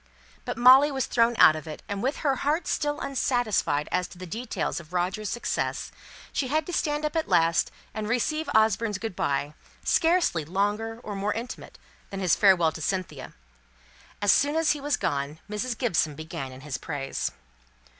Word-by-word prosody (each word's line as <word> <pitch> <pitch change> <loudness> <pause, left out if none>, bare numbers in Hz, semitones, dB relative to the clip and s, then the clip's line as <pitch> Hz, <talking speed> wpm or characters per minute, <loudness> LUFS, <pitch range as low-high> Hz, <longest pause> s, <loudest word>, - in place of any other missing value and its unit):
But - - -4
Molly 260 +4 +7
was 265 -2 -1
thrown 235 0 +2
out 155 - +7
of 155 +1 -7
it; 155 - -8
and 200 -1 -3
with 265 +5 -1
her 275 -2 +2
heart 300 +6 0
still 295 -1 -1
unsatisfied 245 - 0
as 180 0 0
to - - -14
the 185 - -7
details 220 +3 -3
of 170 +1 -14
Roger's 185 +4 -1
success, 240 - -2 0.4
she 265 - 0
had 305 +4 0
to 355 - -6
stand 295 -1 0
up 300 - -3
at 320 - -1
last, 165 0 +3 0.2
and 215 -1 -4
receive 305 +6 0
Osborne's 220 -1 +3
good 220 -2 -5
by, 145 0 -1 0.3
scarcely 330 - +2
longer 205 +7 -1
or 205 - -5
more 200 +2 -1
intimate 235 +2 -7 0.3
than 195 - -5
his 185 -3 +3
farewell 180 -5 +4
to 160 - -9
Cynthia. 160 -6 -3 0.9
As 205 - +5
soon 290 +7 +3
as 325 -1 +3
he 295 - -2
was 290 +1 0
gone, 140 +2 -2
Mrs. 220 +3 -3
Gibson 165 - +1
began 155 -4 -6
in 130 +1 -11
his 145 -1 -5
praise. 140 -3 -3
215 Hz, 180 wpm, -26 LUFS, 170-265 Hz, 0.9 s, Molly